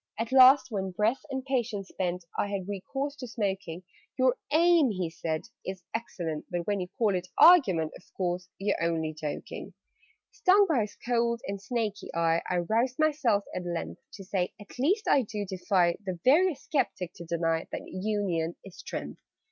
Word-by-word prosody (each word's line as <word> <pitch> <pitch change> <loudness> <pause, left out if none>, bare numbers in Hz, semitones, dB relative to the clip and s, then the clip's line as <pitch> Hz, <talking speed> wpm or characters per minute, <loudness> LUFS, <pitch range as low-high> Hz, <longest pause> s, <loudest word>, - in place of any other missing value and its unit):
At 225 +2 -3
last, 260 0 +7
when, 195 -3 -2
breath 215 +7 0
and 265 -1 -4
patience 235 -7 -2
spent, 180 -1 -3
I - - 0
had 195 -2 -4
recourse 270 +9 -4
to 255 - -6
smoking 195 -6 -3 0.3
"Your 255 -1 +3 0.2
aim," 330 -2 +5
he 185 -5 -2
said, 160 -1 -3 0.2
"is 190 -1 -6
excellent: 170 -9 -4
But 175 -1 -3
when 205 -1 0
you 180 - -3
call 220 -5 +2
it 180 0 -2
argument 195 - +6
Of - - -16
course 180 -1 -2
you're 200 -1 -1
only 160 -2 0
joking?" 150 -1 -6 0.6
Stung 400 +2 +5
by 310 - +2
his 210 -1 -5
cold 235 -1 +1
and 200 0 -4
snaky 210 -2 -3
eye, 165 0 +2
I 180 - +1
roused 245 +3 +1
myself 290 -10 +2
at 180 - -3
length 125 - -4
To 195 - -9
say 185 -1 -1
"At 205 +4 -13
least 380 - +1
I 275 - +5
do 210 -3 -4
defy 185 -2 +1
The 185 -3 -4
veriest 310 +2 +3
sceptic 215 - -1
to 170 - -8
deny 165 -1 -1
That - - -4
union 185 -4 -2
is 195 - -12
strength!" - - -6
200 Hz, 175 wpm, -28 LUFS, 180-255 Hz, 0.6 s, last